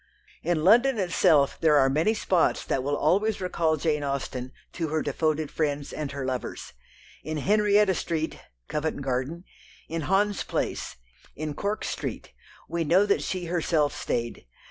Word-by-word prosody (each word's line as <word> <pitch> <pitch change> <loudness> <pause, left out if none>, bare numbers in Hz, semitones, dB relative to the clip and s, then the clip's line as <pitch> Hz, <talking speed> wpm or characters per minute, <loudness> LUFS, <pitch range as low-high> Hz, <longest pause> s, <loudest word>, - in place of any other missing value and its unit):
In 165 -2 0
London 240 +7 +5
itself 160 -7 +3
there 160 -2 +5
are 135 -1 +5
many 160 +11 +2
spots 185 -5 +1
that 130 - 0
will 145 +2 -1
always 200 +8 +2
recall 165 -4 0
Jane 150 -1 0
Austen 130 -2 -3 0.2
to 165 -2 -2
her 155 0 -1
devoted 155 +1 -1
friends 145 -2 -2
and 150 -3 -4
her 140 -1 -4
lovers. 130 -1 -4 0.5
In 155 +1 -3
Henrietta 205 +3 +3
Street 160 -2 -2 0.3
(Covent 150 -2 -2
Garden), 135 +6 -2 0.4
in 165 0 -3
Hans 200 +1 +2
Place, - - -3 0.4
in 155 0 -4
Cork 205 +7 -2
Street, - - -5 0.3
we 170 0 -1
know 180 +6 +4
that 200 - +2
she 185 -2 -3
herself 165 -4 +1
stayed. 115 - -3
160 Hz, 150 wpm, -26 LUFS, 145-185 Hz, 0.5 s, London